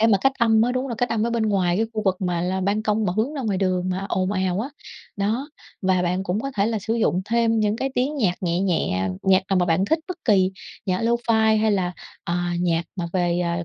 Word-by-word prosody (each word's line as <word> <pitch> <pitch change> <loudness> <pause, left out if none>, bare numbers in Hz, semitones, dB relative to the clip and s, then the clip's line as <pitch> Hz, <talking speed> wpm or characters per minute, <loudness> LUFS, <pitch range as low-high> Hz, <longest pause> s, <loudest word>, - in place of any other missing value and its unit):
để 225 - +5
mà 200 -4 +4
cách 270 - +3
âm 225 -1 +4
á. 245 - +1
Đúng 255 +1 -1
rồi, 245 - -3
cách 245 - +1
âm 225 -1 0
ở 235 - 0
bên 235 -1 0
ngoài 190 -4 +1
cái 225 - +1
khu 215 - -2
vực 190 -3 +1
mà 175 -2 -1
là 185 +2 -1
ban 200 +3 0
công 215 0 +1
mà 180 - 0
hướng 235 +7 0
ra 275 - -3
ngoài 205 -4 -1
đường 185 -1 0
mà 185 +2 -2
ồn 185 +2 0
ào 185 0 0
á. 250 - -3 0.5
Đó, 225 +9 -1 0.3
và 185 -1 +2
bạn 180 +2 0
cũng 195 +3 -1
có 275 - -3
thể 200 - +2
là 225 -1 -1
sử 220 +3 -2
dụng 210 -5 +1
thêm 225 0 +2
những 210 +1 +1
cái 270 +2 -2
tiếng 270 +5 0
nhạc 200 -10 +1
nhẹ 175 0 0
nhẹ, 95 - 0
nhạc 190 0 +4
nào 195 - +3
mà 180 - +2
bạn 170 +3 +2
thích, 320 +8 +1
bất 365 - -4
kỳ, 190 -4 +3 0.3
nhạc 185 +1 0
lofi 225 -2 +2
hay 215 -1 +2
là, 180 -3 0 0.3
à, 175 0 -1
nhạc 170 -1 +1
mà 170 -2 -2
về, 175 -2 +1
à, 170 0 -1
200 Hz, 265 wpm, -23 LUFS, 180-225 Hz, 0.5 s, để